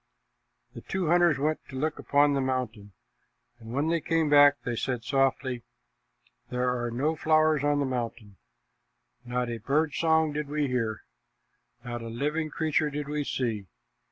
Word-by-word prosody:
The -, -, -9 dB
two 185 Hz, -4 st, -2 dB
hunters 175 Hz, -3 st, +4 dB
went 155 Hz, +3 st, 0 dB
to 135 Hz, -, -9 dB
look 150 Hz, +2 st, -2 dB
upon 145 Hz, 0 st, +3 dB
the 140 Hz, -, +1 dB
mountain, 120 Hz, -6 st, -3 dB, 0.7 s
and 115 Hz, -1 st, -10 dB
when 140 Hz, +5 st, 0 dB
they 165 Hz, -1 st, +1 dB
came 160 Hz, -2 st, +1 dB
back, 145 Hz, -1 st, +7 dB
they 120 Hz, -, -2 dB
said 125 Hz, 0 st, -2 dB
sadly, 130 Hz, -1 st, 0 dB, 0.9 s
"There 125 Hz, 0 st, 0 dB
are 120 Hz, -, -1 dB
no 140 Hz, +7 st, 0 dB
flowers 155 Hz, -1 st, +3 dB
on 145 Hz, 0 st, +2 dB
the 140 Hz, -, +1 dB
mountain. 115 Hz, -5 st, -4 dB, 0.9 s
Not 125 Hz, 0 st, -1 dB
a 115 Hz, -, -4 dB
bird 145 Hz, +6 st, +1 dB
song 160 Hz, -2 st, +2 dB
did 150 Hz, 0 st, -3 dB
we 150 Hz, 0 st, -1 dB
hear. 115 Hz, -5 st, -2 dB, 0.8 s
Not 120 Hz, -1 st, -4 dB
a 115 Hz, -, -6 dB
living 150 Hz, +7 st, -2 dB
creature 155 Hz, -1 st, 0 dB
did 145 Hz, 0 st, -4 dB
we 150 Hz, 0 st, -2 dB
see. 115 Hz, -8 st, -2 dB
140 Hz, 160 wpm, -28 LUFS, 125-150 Hz, 0.9 s, back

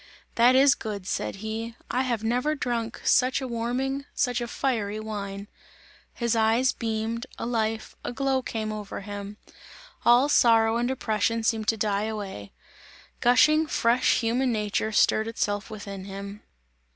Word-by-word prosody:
"That 245 Hz, +2 st, +5 dB
is 275 Hz, +1 st, +6 dB
good," 205 Hz, -6 st, -6 dB
said -, -, -2 dB
he, 225 Hz, +1 st, -4 dB, 0.2 s
"I 250 Hz, -, +1 dB
have 240 Hz, -4 st, -1 dB
never 250 Hz, +7 st, 0 dB
drunk 235 Hz, -4 st, -3 dB
such 255 Hz, +2 st, +3 dB
a 265 Hz, -, -4 dB
warming, 255 Hz, +4 st, -2 dB
such 245 Hz, -2 st, 0 dB
a 240 Hz, -, -3 dB
fiery 220 Hz, -5 st, -2 dB
wine!" 200 Hz, -2 st, -5 dB, 0.7 s
His 235 Hz, -1 st, 0 dB
eyes 225 Hz, +4 st, +3 dB
beamed, 225 Hz, +2 st, -3 dB
a -, -, -4 dB
life, 225 Hz, -2 st, -2 dB
a -, -, -3 dB
glow 270 Hz, +1 st, 0 dB
came 220 Hz, -3 st, -4 dB
over 210 Hz, -2 st, -6 dB
him; 205 Hz, 0 st, -7 dB, 0.7 s
all 245 Hz, +4 st, +5 dB
sorrow 225 Hz, -5 st, +4 dB
and 240 Hz, +1 st, 0 dB
oppression 230 Hz, -2 st, 0 dB
seemed 220 Hz, -1 st, 0 dB
to 225 Hz, -, +2 dB
die 205 Hz, -1 st, 0 dB
away; 200 Hz, -, -6 dB, 0.7 s
gushing, 305 Hz, +6 st, +4 dB
fresh 240 Hz, -2 st, +2 dB
human 245 Hz, +3 st, +1 dB
nature 215 Hz, 0 st, -1 dB
stirred 220 Hz, +1 st, +3 dB
itself 205 Hz, -2 st, -2 dB
within 200 Hz, -3 st, -7 dB
him. 200 Hz, +1 st, -8 dB
225 Hz, 150 wpm, -26 LUFS, 215-245 Hz, 0.7 s, is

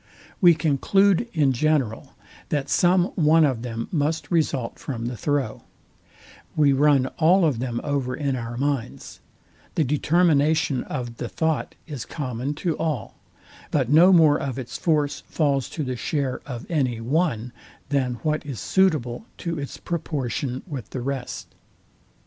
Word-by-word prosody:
We 175 Hz, -3 st, +7 dB
conclude 185 Hz, -, +2 dB
in 145 Hz, -5 st, +2 dB
general, 135 Hz, -4 st, 0 dB, 0.3 s
that 140 Hz, -2 st, -1 dB
some 180 Hz, +1 st, +3 dB
one 160 Hz, -1 st, +4 dB
of 130 Hz, -5 st, -1 dB
them 115 Hz, -2 st, -4 dB
must 155 Hz, +1 st, -1 dB
result 145 Hz, -8 st, 0 dB
from 115 Hz, -4 st, -5 dB
the 120 Hz, +1 st, -3 dB
throw: 140 Hz, -3 st, -1 dB, 0.9 s
We 145 Hz, -2 st, +4 dB
run 140 Hz, -1 st, +4 dB
all 175 Hz, +3 st, +5 dB
of 140 Hz, -7 st, +1 dB
them 120 Hz, -2 st, -2 dB
over 135 Hz, -3 st, -1 dB
in 140 Hz, -1 st, -1 dB
our 120 Hz, -1 st, -5 dB
minds: 140 Hz, -2 st, -3 dB, 0.6 s
The 160 Hz, -, +3 dB
determination 150 Hz, -1 st, +2 dB
of 120 Hz, -4 st, -5 dB
the 120 Hz, -, -4 dB
thought 160 Hz, -2 st, -1 dB
is 145 Hz, -7 st, -6 dB
common 135 Hz, -1 st, -4 dB
to 165 Hz, -3 st, +1 dB
all; 155 Hz, -10 st, -2 dB, 0.6 s
but 130 Hz, -5 st, 0 dB
no 170 Hz, +5 st, +7 dB
more 160 Hz, -5 st, +6 dB
of 135 Hz, -2 st, -4 dB
its 130 Hz, -3 st, -6 dB
force 150 Hz, -4 st, +1 dB
falls 140 Hz, -4 st, 0 dB
to 155 Hz, -, -4 dB
the 130 Hz, -2 st, -3 dB
share 140 Hz, -1 st, -2 dB
of 120 Hz, -4 st, -6 dB
any 130 Hz, -8 st, 0 dB
one, 125 Hz, -2 st, -1 dB, 0.4 s
than 130 Hz, -3 st, 0 dB
what 155 Hz, -1 st, 0 dB
is 140 Hz, -7 st, -6 dB
suitable 155 Hz, -, +1 dB
to 170 Hz, -3 st, -3 dB
its 140 Hz, -, -6 dB
proportion 135 Hz, -6 st, -3 dB
with 140 Hz, -, -7 dB
the 130 Hz, -, -5 dB
rest. 135 Hz, -1 st, -5 dB
145 Hz, 150 wpm, -24 LUFS, 125-160 Hz, 0.9 s, We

